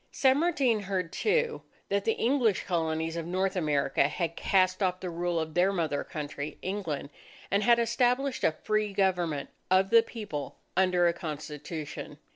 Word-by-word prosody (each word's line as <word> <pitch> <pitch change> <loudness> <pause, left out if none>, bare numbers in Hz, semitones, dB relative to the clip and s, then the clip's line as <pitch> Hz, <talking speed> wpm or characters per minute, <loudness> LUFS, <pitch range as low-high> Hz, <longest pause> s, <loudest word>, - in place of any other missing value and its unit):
San 265 +1 +3
Martin 280 -9 +2
heard, 185 -4 -3
too, 470 +1 +1 0.3
that 200 0 0
the 225 - +3
English 235 -5 +1
Colonies 160 -2 -1
of 165 -1 -4
North 190 +2 0
America 145 -5 +2
had 165 +1 -3
cast 185 0 +2
off 185 -1 +1
the 185 -2 -5
rule 170 0 -1
of 160 -1 -4
their 180 +3 +3
mother 160 -6 -1
country, 145 -1 -6
England, 180 -7 -3 0.4
and 200 - +3
had 235 +2 +5
established 245 +3 +1
a - - +4
free 215 -1 0
government 180 -7 0 0.2
of 190 +1 +3
the 230 0 +8
People 210 - -6 0.2
under 180 -1 +3
a 170 - +2
Constitution. 155 -1 -6
185 Hz, 160 wpm, -29 LUFS, 160-215 Hz, 0.4 s, the